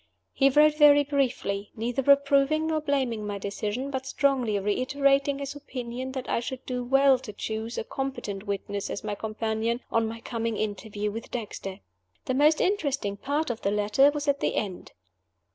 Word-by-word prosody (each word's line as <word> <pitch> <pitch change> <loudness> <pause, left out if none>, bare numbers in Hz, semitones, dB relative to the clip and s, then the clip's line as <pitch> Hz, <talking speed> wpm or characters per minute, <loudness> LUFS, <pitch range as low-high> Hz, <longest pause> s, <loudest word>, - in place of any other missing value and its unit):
He 275 0 +4
wrote 300 +2 +4
very 290 -1 +7
briefly, 255 -8 -1
neither 245 +5 +1
approving 280 +2 +3
nor 315 -1 0
blaming 260 -7 -1
my 205 -1 -3
decision, 210 +6 -3
but 265 -1 -4
strongly 265 -7 +1
reiterating 275 +7 +1
his 280 0 -5
opinion 260 -2 -6
that 260 -1 -5
I - - +1
should 255 +2 -6
do 250 -1 -3
well 270 +1 +4
to 250 -4 -8
choose 220 +3 -4
a - - -1
competent 220 -6 -5
witness 200 0 -3
as - - -5
my 210 -1 -2
companion 220 +2 -2
at 230 - +5
my 225 0 -3
coming 230 -1 -3
interview 210 0 -3
with 225 +2 -7
Dexter. 205 -4 -6 0.4
The 260 - -1
most 300 +4 +4
interesting 285 - 0
part 285 +6 -1
of 230 - -6
the 200 - +1
letter 210 +7 +4
was 290 0 -4
at 280 0 +2
the - - 0
end. 195 -4 -3
250 Hz, 175 wpm, -27 LUFS, 215-280 Hz, 0.4 s, very